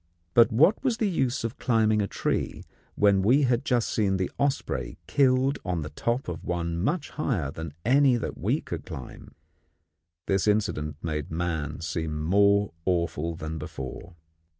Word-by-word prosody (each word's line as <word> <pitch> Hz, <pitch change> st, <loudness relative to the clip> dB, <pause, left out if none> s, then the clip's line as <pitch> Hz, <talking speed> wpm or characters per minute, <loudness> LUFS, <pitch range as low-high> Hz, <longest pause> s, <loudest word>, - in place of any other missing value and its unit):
But 120 Hz, +1 st, +6 dB
what 160 Hz, -, +4 dB
was 250 Hz, -4 st, +1 dB
the 220 Hz, -3 st, +1 dB
use 130 Hz, -9 st, 0 dB
of 115 Hz, +3 st, -4 dB
climbing 110 Hz, -3 st, +2 dB
a 100 Hz, -, 0 dB
tree, -, -, -2 dB, 0.3 s
when 100 Hz, -1 st, +4 dB
we 125 Hz, +9 st, +4 dB
had 125 Hz, -1 st, +2 dB
just 125 Hz, -5 st, +1 dB
seen 100 Hz, -3 st, +1 dB
the 95 Hz, -1 st, -2 dB
osprey 140 Hz, -1 st, -1 dB
killed 135 Hz, 0 st, +2 dB
on 90 Hz, -4 st, -2 dB
the 75 Hz, -, -7 dB
top 120 Hz, -, -2 dB
of 85 Hz, -2 st, -5 dB
one 85 Hz, -1 st, -2 dB
much 150 Hz, -, -1 dB
higher 105 Hz, -, -1 dB
than 80 Hz, -1 st, -7 dB
any 135 Hz, +1 st, +5 dB
that 120 Hz, -, -3 dB
we -, -, 0 dB
could -, -, -6 dB
climb? 65 Hz, -, -9 dB, 0.9 s
This 95 Hz, +1 st, +1 dB
incident 90 Hz, -8 st, 0 dB
made 75 Hz, -3 st, -3 dB
man 80 Hz, -2 st, -3 dB
seem 80 Hz, -1 st, -3 dB
more 100 Hz, +4 st, +3 dB
awful 85 Hz, -2 st, -1 dB
than 80 Hz, -1 st, -5 dB
before. 65 Hz, +6 st, -7 dB
100 Hz, 160 wpm, -27 LUFS, 80-125 Hz, 0.9 s, But